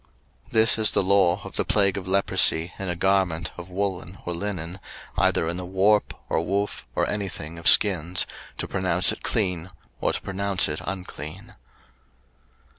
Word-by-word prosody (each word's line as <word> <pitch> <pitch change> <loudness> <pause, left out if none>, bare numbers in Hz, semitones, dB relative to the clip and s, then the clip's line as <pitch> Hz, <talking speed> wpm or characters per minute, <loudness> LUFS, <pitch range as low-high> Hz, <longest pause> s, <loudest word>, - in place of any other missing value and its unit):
03:013:059 120 - -24
This 110 0 +4
is 110 - +4
the - - +1
law 95 -1 +3
of 95 - -8
the - - +2
plague 100 -2 +2
of 95 -2 -5
leprosy 90 -3 +3
in 95 -1 -3
a 90 - -1
garment 90 -3 +1
of 90 +1 -9
woollen 95 -1 -3
or 90 - -2
linen, 90 -1 -4 0.4
either 80 - +2
in 85 +1 -2
the 90 - -5
warp, 100 +3 +2
or - - 0
woof, 100 +3 -2
or - - +1
any 100 -2 -2
thing 85 0 -7
of 85 - -2
skins, 90 -3 +5 0.3
to - - -3
pronounce 90 -1 +2
it - - -7
clean, 90 -4 -1 0.3
or - - +1
to - - -2
pronounce 100 -1 +1
it 75 0 -3
unclean. 90 -2 -7
95 Hz, 175 wpm, -25 LUFS, 85-100 Hz, 0.4 s, skins